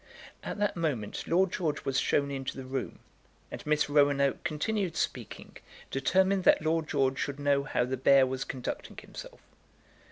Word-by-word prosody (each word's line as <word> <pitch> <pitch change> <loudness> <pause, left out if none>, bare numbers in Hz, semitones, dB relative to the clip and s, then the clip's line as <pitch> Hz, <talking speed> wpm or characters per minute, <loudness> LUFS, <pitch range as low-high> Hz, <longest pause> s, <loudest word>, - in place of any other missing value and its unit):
At - - -5
that 205 0 0
moment 145 -11 -2
Lord 180 +2 +3
George 155 -5 -2
was 135 0 +1
shown 140 0 +1
into 135 -1 -4
the 135 - -6
room, 130 0 -4 0.5
and - - -7
Miss 150 0 +2
Roanoke 140 -2 +2
continued 175 +3 -1
speaking, - - -4 0.3
determined 190 +7 +2
that - - +5
Lord 160 0 0
George 130 -1 +1
should 140 0 -3
know 145 -1 +2
how 120 - 0
the 130 +1 -3
bear 135 +1 +5
was 130 0 -3
conducting 125 -2 -6
himself. - - -10
145 Hz, 160 wpm, -29 LUFS, 135-165 Hz, 0.5 s, that